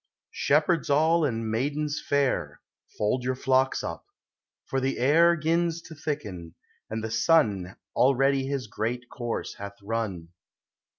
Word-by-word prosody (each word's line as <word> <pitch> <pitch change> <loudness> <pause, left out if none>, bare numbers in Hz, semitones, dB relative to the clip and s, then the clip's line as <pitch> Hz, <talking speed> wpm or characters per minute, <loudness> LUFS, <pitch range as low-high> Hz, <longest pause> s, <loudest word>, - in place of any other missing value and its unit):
Shepherds 155 +3 +2
all, 160 +4 +4
and 115 -5 -1
maidens 145 +5 -1
fair, 130 - 0 0.4
Fold 110 +4 0
your 130 +1 0
Hocks 130 +1 +1
up; - - -6 0.6
for 135 - -1
the 135 +1 -1
air 165 +6 +5
'Gins 165 +1 0
to 165 - -11
thicken, 105 - -5 0.3
and 110 0 -4
(he 110 - -3
sun 110 - +2 0.2
Already 135 +1 +3
his 135 -2 -2
great 120 +3 -3
course 120 -2 -4
bath 100 0 -7
run. 100 -6 -3
130 Hz, 130 wpm, -27 LUFS, 110-150 Hz, 0.6 s, air